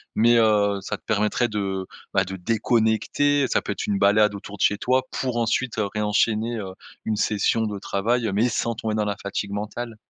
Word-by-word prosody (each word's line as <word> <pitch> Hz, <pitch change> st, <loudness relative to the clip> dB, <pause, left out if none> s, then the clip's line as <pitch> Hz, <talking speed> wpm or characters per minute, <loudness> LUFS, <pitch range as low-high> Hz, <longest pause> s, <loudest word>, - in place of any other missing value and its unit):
mais 120 Hz, +2 st, +5 dB
heu 105 Hz, -3 st, +3 dB
ça -, -, -4 dB
te -, -, -36 dB
permettrait 105 Hz, +3 st, +1 dB
de 95 Hz, -3 st, -3 dB, 0.3 s
bah 95 Hz, -1 st, +3 dB
de 95 Hz, +1 st, -6 dB
déconnecter 115 Hz, +7 st, +1 dB
ça -, -, +1 dB
peut -, -, -4 dB
être 100 Hz, -, -4 dB
une 100 Hz, -1 st, 0 dB
balade 105 Hz, +1 st, +4 dB
autour 100 Hz, 0 st, -9 dB
de -, -, -9 dB
chez 105 Hz, -, +3 dB
toi 130 Hz, +4 st, +1 dB
pour 125 Hz, -3 st, -2 dB
ensuite, 115 Hz, +1 st, 0 dB
heu, 105 Hz, -, +1 dB
réenchaîner, 110 Hz, +2 st, +1 dB
heu, 95 Hz, -3 st, -6 dB, 0.3 s
une 110 Hz, -, 0 dB
session 105 Hz, +1 st, +1 dB
de 100 Hz, -1 st, -5 dB
travail, 115 Hz, +5 st, 0 dB
heu, 100 Hz, -, -2 dB
mais 115 Hz, +5 st, +2 dB
sans 115 Hz, +1 st, -1 dB
tomber 110 Hz, -1 st, -3 dB
dans 105 Hz, -1 st, 0 dB
la 100 Hz, -, -1 dB
fatigue 100 Hz, 0 st, -3 dB
mentale? 110 Hz, +3 st, -5 dB
105 Hz, 210 wpm, -24 LUFS, 100-115 Hz, 0.3 s, mais